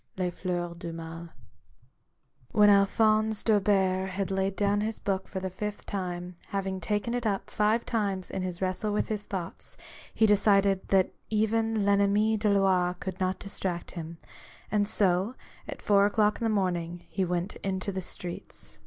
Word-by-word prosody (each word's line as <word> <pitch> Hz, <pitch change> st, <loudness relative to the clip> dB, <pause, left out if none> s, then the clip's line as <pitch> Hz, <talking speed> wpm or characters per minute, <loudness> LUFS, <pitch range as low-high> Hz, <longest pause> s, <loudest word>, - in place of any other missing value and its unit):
— -, -, -40 dB
Les 180 Hz, -1 st, 0 dB
Flairs 175 Hz, -1 st, -3 dB
du 170 Hz, -, -5 dB
Mai. 165 Hz, +1 st, -7 dB, 1.3 s
When 210 Hz, -1 st, +6 dB
Alphonse 215 Hz, +2 st, +3 dB
D'Aubert 195 Hz, -3 st, +2 dB
had 195 Hz, 0 st, -3 dB
laid 190 Hz, 0 st, 0 dB
down 205 Hz, 0 st, +1 dB
his 220 Hz, +1 st, -2 dB
book 190 Hz, -1 st, -2 dB
for 190 Hz, -, -4 dB
the 190 Hz, 0 st, -4 dB
fifth 210 Hz, +2 st, -5 dB
time, 180 Hz, -3 st, -4 dB
having 195 Hz, -2 st, -2 dB
taken 210 Hz, +6 st, -1 dB
it 245 Hz, 0 st, -1 dB
up 200 Hz, -2 st, -2 dB
five 215 Hz, +2 st, +2 dB
times 200 Hz, -5 st, -2 dB
in 190 Hz, -, -3 dB
his 185 Hz, 0 st, -3 dB
wrestle 185 Hz, +3 st, -1 dB
with 210 Hz, -, 0 dB
his 210 Hz, -1 st, -3 dB
thoughts, 185 Hz, -4 st, -6 dB, 0.3 s
he 220 Hz, -, +3 dB
decided 200 Hz, -2 st, +3 dB
that 190 Hz, -1 st, +3 dB, 0.2 s
even 220 Hz, +1 st, +1 dB
VEnmmi 200 Hz, +1 st, +3 dB
des 210 Hz, 0 st, +2 dB
Lois 190 Hz, -3 st, +3 dB
could 190 Hz, -1 st, -5 dB
not 185 Hz, 0 st, 0 dB
distract 185 Hz, -3 st, -4 dB
him, 165 Hz, -1 st, -7 dB, 0.5 s
and 205 Hz, -1 st, +2 dB
so, 200 Hz, +2 st, +2 dB, 0.3 s
at -, -, -7 dB
four 200 Hz, -1 st, +5 dB
o'clock 210 Hz, +1 st, +1 dB
in -, -, 0 dB
the -, -, +2 dB
morning, 175 Hz, -4 st, -1 dB
he 190 Hz, -, -1 dB
went 180 Hz, +1 st, -2 dB
into 190 Hz, 0 st, -2 dB
the 190 Hz, 0 st, -3 dB
streets. 175 Hz, -1 st, -6 dB
195 Hz, 170 wpm, -28 LUFS, 185-210 Hz, 1.3 s, When